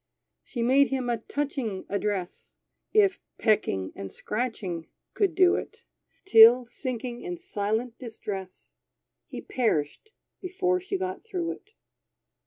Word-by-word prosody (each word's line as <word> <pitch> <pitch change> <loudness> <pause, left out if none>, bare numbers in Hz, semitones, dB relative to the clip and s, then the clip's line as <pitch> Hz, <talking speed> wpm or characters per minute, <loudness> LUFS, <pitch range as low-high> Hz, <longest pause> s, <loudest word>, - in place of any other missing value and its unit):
She 240 -3 -4
made 270 +3 +5
him 255 -3 -1
a 235 - 0
touching 245 -5 -3
address, 200 -3 -3 0.3
If 405 -3 +4 0.2
pecking 95 - +1
and 95 -1 -7
scratching 210 -8 -3 0.3
could 390 -6 +1
do 370 -1 +6
it; - - -6 0.4
Till 240 - +8
sinking 245 -1 -5
in 355 -1 -5
silent 225 - -2
distress, 205 -6 -7 0.5
He - - -7
perished 225 - -1 0.3
before 365 0 0
she 380 +2 -3
got 375 0 -4
through 360 -6 -3
it. 415 +5 -12
245 Hz, 120 wpm, -27 LUFS, -, 0.5 s, Till